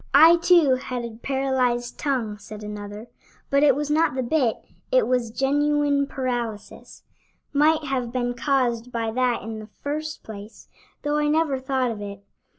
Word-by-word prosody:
"I, 325 +4 +9
too, 335 -5 +5
had 250 -2 -4
a 230 -1 -8
paralyzed 255 -3 0
tongue," 235 -8 -1
said 210 +1 -10
another, 210 +1 -7 0.5
"but 280 0 +4
it 285 -3 +5
was 295 +1 -2
not 310 -3 +2
the 260 - -1
bit, 245 -3 +1 0.4
it - - +4
was 250 -2 +1
genuine 285 +3 +1
paralysis 240 -6 -5 0.5
might 305 +2 +3
have 260 -4 -2
been 245 -1 -1
caused 250 -3 0
by 230 -2 -2
that 250 -1 0
in 220 0 -6
the 215 - -9 0.2
first 305 +2 -4
place, 210 0 -10 0.4
though 295 0 0
I 300 0 +1
never 300 -3 +1
thought 260 -2 0
of 215 -2 -6
it. 200 -1 -7
255 Hz, 160 wpm, -24 LUFS, 230-290 Hz, 0.5 s, I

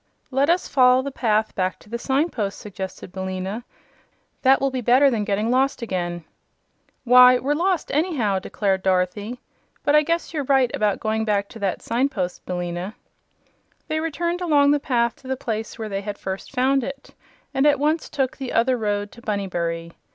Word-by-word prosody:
"Let 275 +3 +2
us 350 +2 +2
follow 255 -1 +4
the 280 - -4
path 220 -4 0
back 185 -1 -1
to - - -20
the 235 +2 -4
signpost," 265 - -1
suggested 190 -3 -7
Billina. 190 +4 -4 0.8
"That 265 0 +5
will 275 0 0
be 260 -1 -2
better 255 +4 +5
than 220 -3 0
getting 210 +2 0
lost 265 0 +1
again." 175 -5 -3 0.8
"Why, 250 0 +8
we're 275 +4 0
lost 355 +3 0
anyhow," 275 - +1
declared 195 0 -1
Dorothy; 190 +6 0 0.4
"but 290 - +3
I 300 - +7
guess 335 +2 -2
you're 300 -3 -1
right 265 -2 +3
about 210 -2 +1
going 220 0 -1
back 205 -2 0
to 225 - -11
that 195 -3 -2
signpost, 230 -7 -2
Billina." 175 +2 -4 0.9
They 310 - 0
returned 340 +3 -2
along 290 -5 +4
the 295 - +3
path 240 -4 0
to 265 - -15
the 265 0 -2
place 220 -2 -4
where 220 -2 -4
they 195 -1 -3
had 205 0 -5
first 190 0 -6
found 270 +1 +2
it, 275 +2 -7 0.4
and 270 +2 +3
at 290 -1 +4
once 305 +3 0
took 270 -3 -1
"the 265 -2 -5
other 245 +2 +3
road" 205 -1 -1
to 235 - -14
Bunnybury. 170 -6 -3
235 Hz, 180 wpm, -23 LUFS, 200-275 Hz, 0.9 s, Why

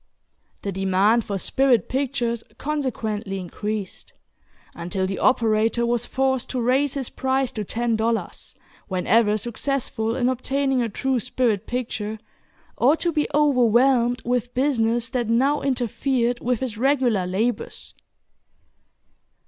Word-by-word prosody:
The 200 - -2
demand 195 +4 +2
for 200 - -2
"spirit" 260 +4 +2
pictures 250 -4 -1
consequently 220 -9 -3
increased, 205 +2 -5 0.6
until 185 +3 -3
the 190 +1 -3
operator 230 -1 +2
was 240 0 0
forced 265 -1 0
to 255 - -2
raise 260 +4 +1
his 270 -3 -3
price 265 -1 0
to 215 - -4
ten 230 +3 -1
dollars, 225 +1 -2 0.3
whenever 210 +3 +2
successful 235 0 -2
in 250 -1 +1
obtaining 265 +1 0
a 230 - -1
true 260 +4 -1
"spirit 230 -4 0
picture," 220 -3 -3 0.6
or 275 +6 +4
to 345 - 0
be 300 -2 0
overwhelmed 250 -3 +3
with 245 0 -1
business 240 -3 +1
that 240 -3 -1
now 270 +6 +2
interfered 245 -1 0
with 250 -1 -1
his 235 -5 -4
regular 250 -8 +2
labors. 220 +7 -2
240 Hz, 125 wpm, -23 LUFS, 220-265 Hz, 0.6 s, or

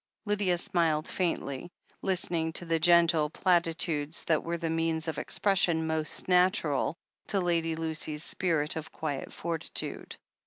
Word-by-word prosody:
Lydia 200 -4 +1
smiled 165 -5 +1
faintly, 170 -4 -2 0.3
listening 170 -4 +1
to 175 - -2
the 165 -1 0
gentle 170 -2 +4
plati 170 -1 +2
tudes 155 -2 -2
that 160 -2 +1
were 170 +1 -2
the 165 0 -3
means 165 0 -1
of 160 - -2
expression 175 -5 +2
most 160 -1 -2
natural 180 -5 +2 0.3
to 200 - +1
Lady 165 -2 0
Lucy's 160 -1 0
spirit 160 -6 0
of 160 -1 -6
quiet 150 -3 -4
fortitude. 165 -2 -5
165 Hz, 140 wpm, -29 LUFS, 160-175 Hz, 0.3 s, gentle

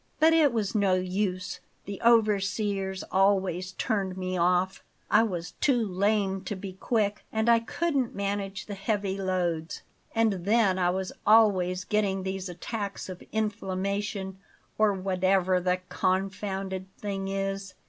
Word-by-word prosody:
But 320 +1 +6
it 310 -4 +5
was 215 -4 -1
no 200 -4 +3
use; 185 0 -2 0.3
the 200 0 -6
overseers 205 -3 +2
always 190 -1 +2
turned 195 -5 -1
me 185 0 -3
off. 180 +2 +1 0.3
I 210 - +6
was 180 -6 -2
too 245 -6 +3
lame 195 0 +1
to 205 - -3
be 190 0 -7
quick; 210 +1 -1
and 220 +1 0
I 235 -1 +6
couldn't 270 +1 -1
manage 200 0 -3
the 205 - -6
heavy 200 -1 -2
loads. 175 -4 -2 0.3
And 220 -6 +2
then 200 -2 +3
I 175 -1 +3
was 190 +1 -2
always 190 -4 +4
getting 195 -2 0
these 190 0 -4
attacks 200 +3 -5
of 185 -1 -7
inflammation, 200 -2 -2 0.4
or 215 -1 +4
whatever 185 -1 +1
the 180 0 0
confounded 190 0 -2
thing 195 -2 -4
is. 195 0 -3
195 Hz, 140 wpm, -28 LUFS, 185-210 Hz, 0.4 s, But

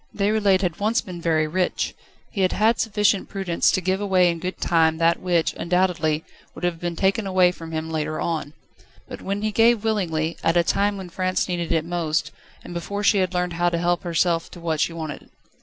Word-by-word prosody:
Déroulède 200 -2 +2
had 175 -4 -2
once 220 +3 +2
been 180 -5 -7
very 160 -2 +2
rich. 180 +4 -1 0.4
He 200 - -2
had 185 - +2
had 220 +2 +2
sufficient 210 -2 +1
prudence 190 -4 +1
to 185 - 0
give 190 +2 0
away 185 -3 +3
in 170 - -5
good 185 +2 -4
time 160 -1 +2
that 170 +1 +2
which, 175 -3 +1
undoubtedly, 170 -3 0 0.3
would - - -10
have 175 -2 -1
been 175 0 -3
taken 195 +4 +1
away 185 -1 +4
from 165 -2 -10
him 160 0 -3
later 155 -1 -2
on. 155 -3 -2 0.5
But - - -8
when 200 +2 -3
he 215 - 0
gave 225 0 +4
willingly, 170 -7 -1
at 165 +1 +2
a 170 - +5
time 200 +4 +1
when 190 -2 -7
France 185 +1 -1
needed 175 -2 -2
it 160 -1 +1
most, 160 -3 -1 0.3
and - - -9
before 200 +4 -4
she 205 0 +4
had 185 -1 0
learned 180 -1 0
how 175 +1 +1
to 170 - -1
help 175 0 +1
herself 170 -1 0
to 175 - -11
what 165 -2 -2
she 165 - +1
wanted. 160 -3 -7
175 Hz, 210 wpm, -23 LUFS, 165-195 Hz, 0.5 s, a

